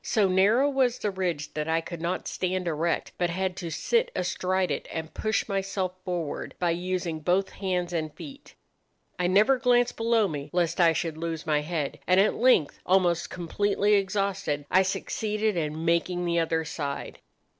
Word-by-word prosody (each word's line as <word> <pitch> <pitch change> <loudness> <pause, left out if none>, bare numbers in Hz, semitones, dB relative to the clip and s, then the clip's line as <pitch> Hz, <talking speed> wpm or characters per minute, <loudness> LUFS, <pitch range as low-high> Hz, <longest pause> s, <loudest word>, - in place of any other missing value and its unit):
So 210 -4 +2
narrow 200 +9 +4
was 260 -3 +1
the 210 - -2
ridge 175 -6 -3
that 150 0 -3
I 160 0 +2
could 165 0 -7
not 170 +2 -2
stand 185 -1 -2
erect, 165 +1 -1
but 175 -1 +1
had 185 +1 -2
to 170 - -4
sit 470 - +1
astride 185 0 0
it, 140 - -3
and 160 -1 -5
push 215 0 -1
myself 195 -2 -2
forward 175 -5 -4
by 175 -1 +1
using 175 -1 -2
both 180 +5 +1
hands 180 -2 -2
and 155 -2 -2
feet. 280 -1 -11 0.6
I 180 - +2
never 210 +8 +4
glanced 245 -1 +2
below 225 -2 +2
me, 145 -3 -5
lest 175 0 +1
I 170 -1 +6
should 160 0 -2
lose 165 -1 -4
my 150 -2 +2
head; 150 -2 -3
and 185 +1 +5
at 200 - +4
length, 240 - +3
almost 175 -2 +2
completely 205 +4 0
exhausted, 195 -6 0
I 185 - +6
succeeded 210 +2 -1
in 160 -1 -2
making 175 +1 +1
the 170 0 +1
other 165 0 0
side. 145 -3 -5
180 Hz, 175 wpm, -27 LUFS, 165-200 Hz, 0.6 s, I